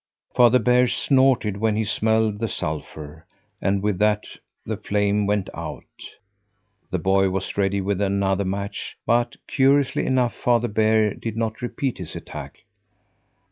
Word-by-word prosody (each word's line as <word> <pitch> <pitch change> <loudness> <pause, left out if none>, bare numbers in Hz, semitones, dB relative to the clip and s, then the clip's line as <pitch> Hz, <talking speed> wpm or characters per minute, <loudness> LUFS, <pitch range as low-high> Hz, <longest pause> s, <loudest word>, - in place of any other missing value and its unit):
Father 125 0 +6
Bear 125 +2 +3
snorted 130 -7 +2
when 110 0 +1
he 110 - +1
smelled 110 0 +1
the 115 - -1
sulphur, 75 -2 -6 0.3
and 100 0 0
with 105 -3 0
that 105 0 +2 0.4
the - - -2
flame 105 0 0
went 105 -2 0
out. - - -6 1.1
The 95 - -1
boy 95 +2 +2
was 95 0 -3
ready 100 0 +1
with 100 0 -1
another 100 0 +1
match, 100 +1 -4
but, 120 +1 +1
curiously 135 0 +2
enough, 125 -2 +1
Father 120 -1 +1
Bear 110 0 +2
did 115 -1 -6
not 110 0 -2
repeat 125 +1 -3
his 90 - -7
attack. - - -9
105 Hz, 140 wpm, -23 LUFS, 100-120 Hz, 1.1 s, Father